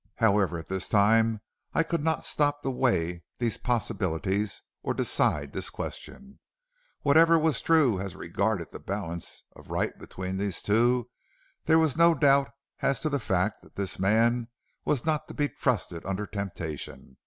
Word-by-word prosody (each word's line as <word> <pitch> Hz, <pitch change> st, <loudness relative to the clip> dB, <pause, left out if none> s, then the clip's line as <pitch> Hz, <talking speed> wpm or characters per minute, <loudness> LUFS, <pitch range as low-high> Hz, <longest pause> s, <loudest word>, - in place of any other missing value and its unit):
"However, 100 Hz, -6 st, +2 dB
at 80 Hz, -, -8 dB
this 95 Hz, -1 st, -2 dB
time 110 Hz, +1 st, +3 dB, 0.3 s
I 165 Hz, -, +4 dB
could 165 Hz, -2 st, -2 dB
not 160 Hz, -1 st, 0 dB
stop 145 Hz, -1 st, +1 dB
to 135 Hz, -, 0 dB
weigh 90 Hz, -10 st, 0 dB, 0.2 s
these 120 Hz, -3 st, -1 dB
possibilities 100 Hz, -4 st, -1 dB, 0.2 s
or -, -, -2 dB
decide 70 Hz, -2 st, +1 dB
this -, -, -2 dB
question. 205 Hz, 0 st, -8 dB, 0.6 s
Whatever 165 Hz, +3 st, +6 dB
was 155 Hz, -5 st, +1 dB
true 145 Hz, -, +3 dB
as 95 Hz, -1 st, -5 dB
regarded 95 Hz, +1 st, -2 dB
the -, -, -8 dB
balance 85 Hz, -4 st, -5 dB
of -, -, -15 dB
right -, -, -1 dB
between 95 Hz, 0 st, -5 dB
these 100 Hz, -2 st, -2 dB
two, 120 Hz, +3 st, +2 dB, 0.5 s
there 160 Hz, -, +5 dB
was 160 Hz, -4 st, +2 dB
no 170 Hz, 0 st, +5 dB
doubt 140 Hz, -2 st, +4 dB, 0.3 s
as 135 Hz, -, +1 dB
to 155 Hz, -, 0 dB
the 140 Hz, -1 st, 0 dB
fact 95 Hz, 0 st, 0 dB
that -, -, -20 dB
this 100 Hz, -1 st, -3 dB
man 115 Hz, +4 st, +2 dB, 0.4 s
was 140 Hz, -3 st, 0 dB
not 155 Hz, -2 st, 0 dB
to -, -, -9 dB
be 145 Hz, -, +1 dB
trusted 95 Hz, -9 st, -1 dB
under 95 Hz, +2 st, -3 dB
temptation. 85 Hz, -10 st, -6 dB
110 Hz, 160 wpm, -28 LUFS, 95-140 Hz, 0.6 s, Whatever